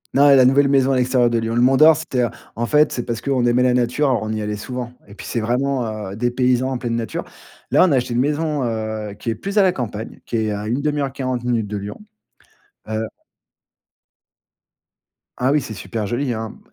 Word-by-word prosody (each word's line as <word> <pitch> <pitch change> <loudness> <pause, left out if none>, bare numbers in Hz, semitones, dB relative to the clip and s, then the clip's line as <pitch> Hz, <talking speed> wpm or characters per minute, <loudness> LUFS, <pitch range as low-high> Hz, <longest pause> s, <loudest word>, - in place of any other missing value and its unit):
Non, 145 +1 +6
et 140 - +8
la 130 -2 +6
nouvelle 140 +2 +4
maison 135 -1 +3
à 135 - +2
l'extérieur 125 -1 +2
de 115 - +1
Lyon. 115 +1 -2
Le 120 - +3
Mont 130 +2 +5
d'or 155 +3 +7
c'était 130 -5 -1 0.3
en 120 +1 -2
fait 150 0 +4
c'est 120 - -3
parce 115 -2 -3
qu'on 130 -2 0
aimait 120 +1 +3
la 125 -1 +3
nature, 125 +4 +1
on 110 0 -3
y 110 -1 -2
allait 105 0 -3
souvent 125 +2 -6
et 100 - -13
puis 105 - -10
c'est 115 - -2
vraiment, 115 -4 -1
heu, - - -7
dépaysant 125 +2 +1
en 130 - -1
pleine 120 -2 -3
nature. 115 -1 -3 0.5
Là - - +5
on 185 - +3
a 140 - +4
acheté 125 -1 0
une 120 - +1
maison, 150 +1 0
heu, 110 -3 -3
qui 115 +2 -3
est - - -3
plus 200 - -5
à 205 - +6
la 185 - +4
campagne, 110 -5 -6
qui 115 - -2
est 110 -1 0
à 105 +1 -4
une 125 +5 -1
1/2, 145 -3 0
40 130 -3 -3
minutes 120 -3 0
de 105 0 -4
Lyon. 100 - -7 0.9
Heu 110 0 -2 2.3
Ah 130 +2 +1
oui, 150 0 +3
c'est 115 -4 -7
super 100 +3 -4
joli, 120 +4 -1
hein. 110 -1 -5
120 Hz, 225 wpm, -20 LUFS, 110-135 Hz, 2.3 s, et